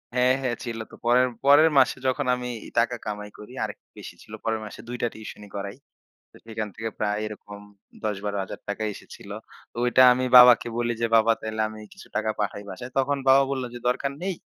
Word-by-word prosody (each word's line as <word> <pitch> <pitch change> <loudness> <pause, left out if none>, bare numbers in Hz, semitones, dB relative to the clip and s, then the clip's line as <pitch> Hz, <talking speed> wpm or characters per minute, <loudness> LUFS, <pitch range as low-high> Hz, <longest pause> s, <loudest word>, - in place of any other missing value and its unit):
হ্যাঁ, 125 +1 +4
হ্যাঁ, 125 -3 -1
ছিল 115 -2 -5
তো। - - -13
পরের 125 +2 +4 0.2
পরের 150 +3 +7
মাসে 130 - +4
যখন 135 +2 0
আমি 125 0 -5 0.3
টাকা 120 +1 +1
কামাই 105 0 -5
করি, 105 +4 -11
আরেকটু - - -7
বেশি - - -10
ছিল। - - -14
পরের 110 -1 -1
মাসে 105 - -10
২ 125 0 -5
টা 120 - +2
টিউশনি 105 -1 -10
করাই। 100 +4 -5 0.5
তো - - -20
সেইখান 110 -1 -5
থেকে 115 0 -4
প্রায় 105 0 0
এরকম 105 -1 -9 0.5
৳১০,০০০-৳১২,০০০ 100 0 -4
এসেছিল। - - -13 0.4
তো - - -19
ওইটা 125 +1 +5
আমি 130 +1 0
বাবাকে 125 -1 +8
বলি 120 0 0
যে, 115 - +2
"বাবা 115 +1 +5
তাইলে 110 0 -4
আমি 110 0 -10
কিছু 195 - -14
টাকা 110 0 0
পাঠাই 100 0 -2
বাসায়?" 125 0 -8
তখন 140 +2 +1
বাবা 135 +1 +7
বলল 130 -2 -2
যে, - - -6
"দরকার 140 +2 -1
নেই, 190 -1 -1
120 Hz, 195 wpm, -25 LUFS, 105-125 Hz, 0.5 s, বাবাকে